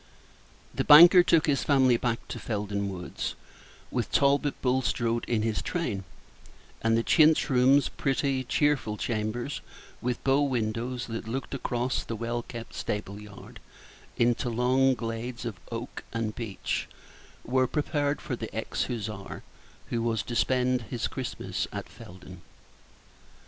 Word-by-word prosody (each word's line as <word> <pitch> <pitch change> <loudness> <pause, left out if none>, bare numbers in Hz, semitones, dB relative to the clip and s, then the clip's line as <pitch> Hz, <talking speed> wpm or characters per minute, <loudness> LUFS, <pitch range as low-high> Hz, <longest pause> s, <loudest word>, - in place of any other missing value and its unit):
The - - -1
banker 175 +5 +10
took 165 -2 +3
his 145 -3 +1
family 130 -4 +4
back 115 -1 -2
to - - -5
Felden 100 -2 -2
Woods, 90 -2 -5 0.6
with - - -2
Talbot 140 +1 +2
Bulstrode 125 -2 0
in 115 -3 0
his 110 -2 -1
train; 110 - -3 0.8
and 115 0 +3
the 115 - +1
chintz 155 0 +4
rooms 130 +3 +5
pretty, 135 -1 -1
cheerful 135 -5 +1
chambers, 115 +5 -3 0.4
with 125 0 -2
bow 135 +1 +3
windows 120 -1 -1
that 115 -1 -6
looked 130 +5 -4
across 125 -2 -1
the 115 - -5
well 120 +2 -2
kept 115 -1 -9
stable 105 0 -4
yard 105 -1 -12 0.6
into 120 +1 +2
long 130 +3 +3
glades 120 +1 -5
of 110 -5 -4
oak 115 +2 -6
and 115 -2 -2
beech 110 -5 -3 0.6
were 130 +1 +2
prepared 145 0 -1
for 130 - -3
the 115 -2 -6
ex 110 - -2
Hussar, 105 -5 -5 0.5
who 115 - 0
was 115 -2 0
to 120 - -5
spend 125 +1 +2
his 120 -2 -2
Christmas 130 -2 -4
at - - -5
Felden. 90 -1 -12
120 Hz, 140 wpm, -28 LUFS, 115-135 Hz, 0.8 s, banker